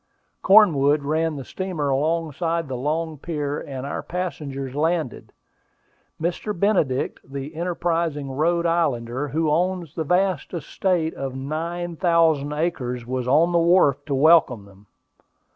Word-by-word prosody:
Cornwood 155 Hz, -8 st, +5 dB
ran 160 Hz, +2 st, 0 dB
the 135 Hz, -3 st, -7 dB
steamer 180 Hz, -7 st, -3 dB
alongside 165 Hz, +3 st, -1 dB
the 130 Hz, -, -4 dB
long 155 Hz, +4 st, -2 dB
pier, 150 Hz, -2 st, -3 dB
and 135 Hz, -1 st, -6 dB
our 140 Hz, -, -4 dB
passengers 145 Hz, -7 st, -5 dB
landed. 160 Hz, -2 st, -1 dB, 0.9 s
Mr. 175 Hz, +3 st, -3 dB
Benedict, 170 Hz, -11 st, +1 dB
the 140 Hz, +3 st, -7 dB
enterprising 165 Hz, -4 st, -2 dB
Rhode 170 Hz, +5 st, +1 dB
Islander 140 Hz, -6 st, 0 dB
who 155 Hz, +1 st, 0 dB
owns 175 Hz, -1 st, -1 dB
the 160 Hz, -, -2 dB
vast 180 Hz, +1 st, 0 dB
estate 165 Hz, +1 st, -1 dB
of 135 Hz, -1 st, -5 dB
nine 165 Hz, +5 st, -4 dB
thousand 165 Hz, -5 st, +2 dB
acres, 135 Hz, -6 st, -2 dB
was 125 Hz, 0 st, -3 dB
on 155 Hz, +6 st, +4 dB
the 170 Hz, -, +3 dB
wharf 165 Hz, -5 st, +3 dB
to 140 Hz, -, 0 dB
welcome 135 Hz, -7 st, +4 dB
them. 100 Hz, +1 st, -19 dB
155 Hz, 130 wpm, -23 LUFS, 140-170 Hz, 0.9 s, Cornwood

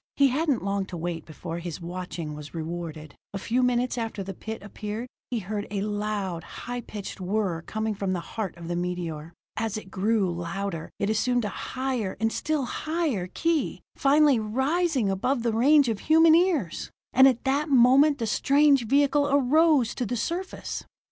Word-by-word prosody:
He 280 Hz, -1 st, +5 dB
hadn't 285 Hz, -, 0 dB
long 200 Hz, -1 st, -1 dB
to 175 Hz, -, -6 dB
wait 165 Hz, -1 st, -4 dB
before 165 Hz, +1 st, -6 dB
his 170 Hz, -2 st, -6 dB
watching 175 Hz, -2 st, -5 dB
was 150 Hz, +1 st, -9 dB
rewarded. 160 Hz, -2 st, -5 dB, 0.2 s
A -, -, 0 dB
few 235 Hz, +6 st, 0 dB
minutes 250 Hz, 0 st, +1 dB
after 225 Hz, -3 st, -3 dB
the 195 Hz, +1 st, -6 dB
pit 220 Hz, +2 st, -7 dB
appeared, 210 Hz, +3 st, -5 dB, 0.2 s
he 245 Hz, -, -1 dB
heard 205 Hz, 0 st, -4 dB
a 200 Hz, -1 st, -2 dB
loud, 205 Hz, -4 st, -2 dB
high 245 Hz, +6 st, -6 dB
pitched 205 Hz, -3 st, -7 dB
whir 185 Hz, -3 st, -1 dB
coming 220 Hz, +4 st, -2 dB
from 195 Hz, -1 st, -2 dB
the 180 Hz, -, -1 dB
heart 195 Hz, +1 st, -5 dB
of 170 Hz, -1 st, -8 dB
the 175 Hz, -, -2 dB
meteor. 175 Hz, -3 st, -3 dB, 0.3 s
As 220 Hz, -2 st, -1 dB
it 190 Hz, -3 st, -9 dB
grew 200 Hz, -1 st, +1 dB
louder, 170 Hz, 0 st, -4 dB
it 200 Hz, +1 st, 0 dB
assumed 245 Hz, +2 st, +1 dB
a -, -, -1 dB
higher 255 Hz, -7 st, -3 dB
and 225 Hz, +1 st, +1 dB
still 305 Hz, -4 st, -1 dB
higher 305 Hz, -, -2 dB
key, 330 Hz, -, -1 dB
finally 285 Hz, -2 st, +4 dB
rising 265 Hz, -, +1 dB
above 240 Hz, +6 st, 0 dB
the 230 Hz, -2 st, +1 dB
range 280 Hz, +5 st, +5 dB
of 220 Hz, -3 st, -1 dB
human 320 Hz, +1 st, +5 dB
ears. 330 Hz, -, +1 dB, 0.2 s
And 265 Hz, +1 st, +8 dB
at 255 Hz, -3 st, +1 dB
that 280 Hz, +3 st, +1 dB
moment 275 Hz, +3 st, +6 dB
the 235 Hz, -, -2 dB
strange 275 Hz, +2 st, +3 dB
vehicle 285 Hz, +2 st, +3 dB
arose 285 Hz, -2 st, +4 dB
to 245 Hz, -, -3 dB
the 245 Hz, -, -2 dB
surface. 350 Hz, -, -4 dB
220 Hz, 175 wpm, -26 LUFS, 185-270 Hz, 0.3 s, And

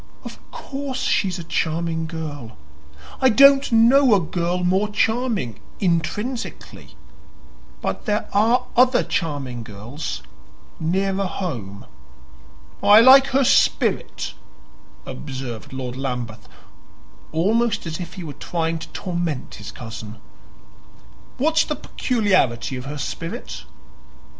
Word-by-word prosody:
"Of -, -, -9 dB
course 270 Hz, -2 st, -5 dB
she's 190 Hz, -7 st, +1 dB
a 170 Hz, -, -6 dB
charming 165 Hz, 0 st, -1 dB
girl. 145 Hz, -, -7 dB, 0.6 s
I 260 Hz, -, +6 dB
don't 275 Hz, +3 st, +6 dB
know 235 Hz, +2 st, +6 dB
a -, -, +4 dB
girl 175 Hz, +1 st, -2 dB
more 190 Hz, +4 st, +2 dB
charming, 220 Hz, -, 0 dB, 0.2 s
intrinsically. 210 Hz, +8 st, -3 dB, 0.9 s
But -, -, -3 dB
there 210 Hz, 0 st, 0 dB
are 230 Hz, +5 st, +3 dB
other 250 Hz, +1 st, +5 dB
charming 140 Hz, -7 st, -3 dB
girls 115 Hz, +7 st, -6 dB, 0.6 s
nearer 190 Hz, +4 st, 0 dB
home." 120 Hz, -, -5 dB, 1.0 s
"I 210 Hz, +1 st, +8 dB
like 265 Hz, +3 st, +8 dB
her 270 Hz, +1 st, +2 dB
spirit," -, -, +1 dB, 0.7 s
observed 130 Hz, -5 st, -7 dB
Lord 130 Hz, -2 st, -5 dB
Lambeth, 125 Hz, -5 st, -5 dB, 0.8 s
almost 210 Hz, +6 st, +1 dB
as 160 Hz, 0 st, -4 dB
if 175 Hz, 0 st, -7 dB
he 185 Hz, -, -7 dB
were 150 Hz, -3 st, -6 dB
trying 165 Hz, 0 st, -2 dB
to 160 Hz, -, -8 dB
torment 170 Hz, -7 st, -3 dB
his 100 Hz, -, -7 dB
cousin. 110 Hz, -2 st, -8 dB, 1.2 s
"What's 315 Hz, +4 st, +3 dB
the 300 Hz, -, -3 dB
peculiarity 190 Hz, -, 0 dB
of 125 Hz, 0 st, -6 dB
her 145 Hz, +2 st, -5 dB
spirit?" 165 Hz, +4 st, -6 dB
175 Hz, 110 wpm, -22 LUFS, 135-225 Hz, 1.2 s, I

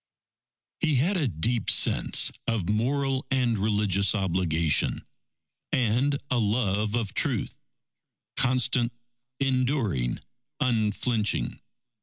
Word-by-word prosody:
_He 155 Hz, -3 st, +2 dB
had 165 Hz, +11 st, +2 dB
a 160 Hz, -7 st, +1 dB
deep 110 Hz, +5 st, -1 dB
sense -, -, +3 dB, 0.2 s
of 110 Hz, -7 st, -1 dB
moral 130 Hz, +5 st, 0 dB
and 125 Hz, -3 st, +1 dB
religious 100 Hz, -1 st, +2 dB
obligation, 85 Hz, -5 st, +1 dB, 0.7 s
and 130 Hz, +4 st, +1 dB
a 125 Hz, -, +2 dB
love 105 Hz, -1 st, 0 dB
of 110 Hz, -5 st, -2 dB
truth, -, -, 0 dB, 0.8 s
constant, 125 Hz, -2 st, +2 dB, 0.5 s
enduring, 130 Hz, -, 0 dB, 0.4 s
unflinching. 110 Hz, -, 0 dB
115 Hz, 90 wpm, -26 LUFS, 100-130 Hz, 0.8 s, sense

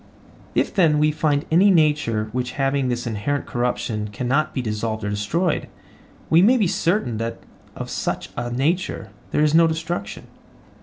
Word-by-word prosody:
If, -, -, +1 dB
then, 165 Hz, -7 st, +4 dB
we 150 Hz, +1 st, +3 dB
find 150 Hz, -1 st, 0 dB
any 185 Hz, +5 st, +5 dB
nature 150 Hz, -, +2 dB
which 125 Hz, +1 st, -3 dB
having 135 Hz, -1 st, 0 dB
this 120 Hz, 0 st, -2 dB
inherent 120 Hz, +6 st, -2 dB
corruption 115 Hz, -3 st, -2 dB
cannot 130 Hz, +8 st, 0 dB
be -, -, -3 dB
dissolved 110 Hz, -2 st, -3 dB
or 105 Hz, -, -2 dB
destroyed, 150 Hz, -, -1 dB, 0.6 s
we 165 Hz, +2 st, +5 dB
may 240 Hz, +7 st, +5 dB
be 215 Hz, -, +2 dB
certain 170 Hz, -, 0 dB
that 115 Hz, +1 st, -3 dB, 0.4 s
of -, -, -5 dB
such -, -, -3 dB
a 120 Hz, 0 st, -3 dB
nature 150 Hz, +10 st, -1 dB, 0.2 s
there 150 Hz, -, +1 dB
is 150 Hz, 0 st, +3 dB
no 165 Hz, 0 st, +6 dB
destruction? 165 Hz, +2 st, -4 dB
140 Hz, 160 wpm, -22 LUFS, 120-165 Hz, 0.6 s, no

